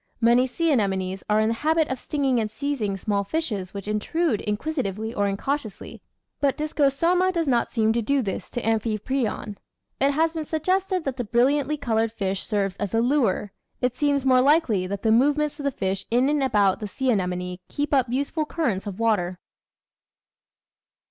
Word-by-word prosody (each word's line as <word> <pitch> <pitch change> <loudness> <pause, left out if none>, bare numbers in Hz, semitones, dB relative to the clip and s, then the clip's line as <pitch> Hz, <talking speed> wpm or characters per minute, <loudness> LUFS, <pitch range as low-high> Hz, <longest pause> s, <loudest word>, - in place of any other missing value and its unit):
Many 240 +2 +4
sea 330 +6 0
anemones 190 -6 0
are 210 0 +3
in 220 0 +2
the - - +1
habit 315 0 +2
of 260 - -3
stinging 275 -4 0
and 215 -1 -1
seizing 220 -5 -2
small 200 0 -1
fishes 205 - -3
which 200 0 -7
intrude 220 - 0
in 210 0 -1
quisitively 225 - -3
or 205 0 +1
incautiously, 220 +3 -4 0.4
but 280 -2 +1
Discosoma 310 +5 +2
does 335 -4 -1
not 240 -3 +1
seem 220 -2 +2
to 235 - 0
do 275 +4 +1
this 195 -3 -4
to 240 - -4
Amphiprion. 220 0 -1 0.4
It 275 +1 +3
has 320 +2 +1
been 320 -2 -4
suggested 370 +4 0
that 270 -3 -3
the 245 - -1
brilliantly 270 +6 +2
coloured 225 -4 0
fish 195 -3 -2
serves 200 -3 -1
as 205 0 -3
a - - +3
lure; 235 -6 +1 0.3
it 250 -1 0
seems 280 0 0
more 255 -1 +5
likely 260 - +3
that 200 +1 -5
the 220 - +3
move 275 +6 +4
ments 300 +1 -1
of 285 - -5
the - - +3
fish 195 -4 -3
in 250 +4 +3
and 295 -1 +1
about 205 -7 +2
the 210 - -4
sea 260 +6 0
anemone 180 -3 -2
keep 290 +1 -2
up 260 -3 +3
useful 280 +5 -1
currents 230 - -1
of 200 0 -6
water. 195 -6 +1
240 Hz, 185 wpm, -24 LUFS, 205-290 Hz, 0.4 s, more